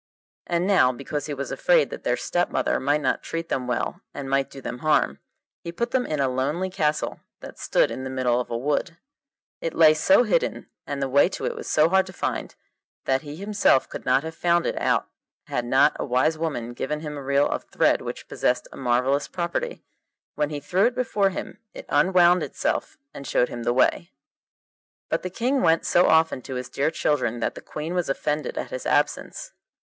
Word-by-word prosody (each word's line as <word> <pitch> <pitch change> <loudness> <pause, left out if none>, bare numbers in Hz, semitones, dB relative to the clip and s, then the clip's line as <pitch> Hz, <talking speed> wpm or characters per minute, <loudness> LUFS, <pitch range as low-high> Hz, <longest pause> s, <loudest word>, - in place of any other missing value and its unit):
And 175 0 0
now, 190 -10 +4
because 140 +3 -5
he 150 - -3
was 140 0 -5
afraid - - +3
that - - -7
their - - +1
stepmother 175 -7 0
might 145 +2 +1
not 135 - 0
treat 165 0 -5
them 125 -1 -2
well 120 - -2
and 140 - -5
might 135 0 +1
do 135 - -10
them 125 -1 -6
harm, 155 +2 +2 0.4
he 170 - -5
put 235 +8 -3
them 260 -1 +1
in 155 -2 -2
a 135 - +2
lonely 145 +9 -1
castle 150 -5 -1 0.2
that - - -11
stood - - +2
in 130 - -5
the 130 - -4
middle 125 -2 +1
of 125 - -4
a 115 - -2
wood. 150 +6 -1 0.6
It 165 - -4
lay 155 -2 +7
so 190 +8 +4
hidden, - - -1 0.2
and 140 -1 -3
the - - 0
way 140 +6 +4
to - - -5
it 485 - -1
was 460 - -7
so 155 +1 +4
hard 190 +2 +3
to 185 - -10
find, - - -3 0.5
that 130 0 +1
he 145 0 -8
himself 200 -7 +2
could - - -8
not 130 +2 +2
have 160 0 -6
found 170 0 +1
it - - -1
out - - +1 0.4
had 120 - -2
not 135 +4 +4
a - - -1
wise 130 +5 +2
woman 145 -7 -3
given 150 +5 -3
him 150 -2 -5
a 145 - -6
reel 140 +1 +2
of - - -3
thread - - +2
which - - -7
possessed 125 - 0
a - - -11
marvellous 130 +3 +1
property: 180 - -3 0.5
when 150 -1 -1
he 150 -1 -4
threw 185 +9 +2
it 250 - -3
before 210 -6 +1
him 185 - -7 0.2
it - - -8
unwound 180 +3 +4
itself - - -2 0.2
and 140 - -8
showed 125 - +2
him 120 - -6
the 120 - 0
way. 130 +7 +2 1.0
But - - 0
the 185 - -4
King 255 +8 0
went 165 0 +3
so 175 - +4
often 160 -4 +3
to 130 +1 -7
his 125 0 -5
dear 140 - 0
children 130 -7 0
that - - 0
the - - -10
Queen 155 +3 -5
was 180 -4 -1
offended 150 +2 -2
at - - -4
his - - -4
absence. - - 0
150 Hz, 210 wpm, -24 LUFS, 135-175 Hz, 1.0 s, lay